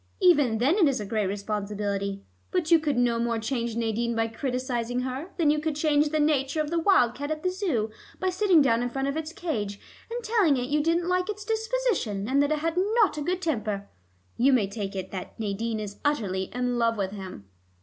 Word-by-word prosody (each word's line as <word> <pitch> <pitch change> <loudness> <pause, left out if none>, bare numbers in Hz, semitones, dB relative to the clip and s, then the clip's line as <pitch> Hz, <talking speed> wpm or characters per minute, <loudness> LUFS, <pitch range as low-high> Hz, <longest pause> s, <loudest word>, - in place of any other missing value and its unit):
Even 295 - +4
then 275 - +2
it 340 - +6
is 270 -4 +1
a 210 - -4
great 215 -1 0
responsibility. 200 -1 -3 0.3
But 350 -3 -1
you 335 - +8
could 295 -4 -1
no 240 -1 +2
more 235 0 0
change 230 0 -2
Nadine 235 0 -1
by 225 0 +1
criticizing 250 0 -2
her, 260 +7 -4
than 315 -4 +4
you 300 - +1
could 310 0 -2
change 295 -1 +2
the 310 +1 0
nature 295 -1 +1
of 305 0 -1
the 340 - +1
wildcat 285 - +3
at 310 0 -3
the 365 - +1
Zoo 320 - -1 0.3
by 375 - +1
sitting 365 -4 +4
down 230 -3 +3
in 245 - -1
front 270 +2 -2
of 280 - -1
its 320 0 -3
cage, 225 - -3 0.3
and 475 +1 -4
telling 420 - +3
it 250 +1 -2
you 300 +1 +2
didn't 335 +2 +1
like 365 +2 +1
its 415 0 -5
disposition, 445 - -1
and 275 +3 +3
that 285 +1 +1
it 310 - +2
had 330 +3 -2 0.2
not 440 -8 +4
a - - -3
good 365 +4 -2
temper. 215 - -2 0.5
You 265 +3 +4
may 235 -6 +4
take 200 -1 -5
it 190 -1 -5
that 190 +3 -7
Nadine 220 +1 -2
is 205 -1 -6
utterly 200 -10 0
in 245 0 -1
love 230 -1 +2
with 195 -2 -1
him." 190 - -8
260 Hz, 220 wpm, -27 LUFS, 220-320 Hz, 0.5 s, you